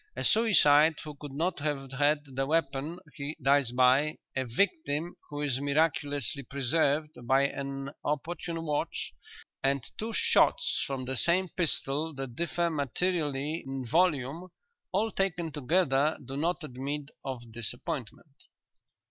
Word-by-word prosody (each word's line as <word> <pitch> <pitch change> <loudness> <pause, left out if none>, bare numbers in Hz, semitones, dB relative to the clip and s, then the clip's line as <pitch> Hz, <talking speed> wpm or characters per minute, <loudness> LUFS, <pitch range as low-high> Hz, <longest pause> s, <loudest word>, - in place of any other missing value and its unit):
"A - - -3
suicide 160 -9 +5
who 150 - -7
could 145 0 -9
not 165 +6 -1
have 140 -2 -2
had 145 +2 +2
the 135 0 -2
weapon 150 +1 0 0.2
he 145 +2 -5
dies 140 -2 +3
by, 130 +5 +4 0.2
a 130 0 0
victim 170 - 0
who 145 0 -4
is 135 -3 0
miraculously 145 -2 +1
preserved 140 +3 +1 0.2
by 135 +2 +5
an 140 0 -3
opportune 165 +2 -3
watch, 150 -1 -2 0.5
and 135 -1 +1 0.2
two 220 +2 -2
shots - - +3
from 135 -2 -3
the 130 +1 -2
same 180 +5 +2
pistol 155 -2 -1
that 135 -3 -6
differ 170 +2 0
materially 150 0 -1
in 135 -1 -5
volume, 160 +2 +1 0.4
all 215 +4 +1
taken 175 -4 -1
together 150 0 +2
do 135 - -6
not 170 +4 0
admit 140 +2 -4
of 120 -4 -6
disappointment." 120 - -6
145 Hz, 130 wpm, -30 LUFS, 135-165 Hz, 0.5 s, suicide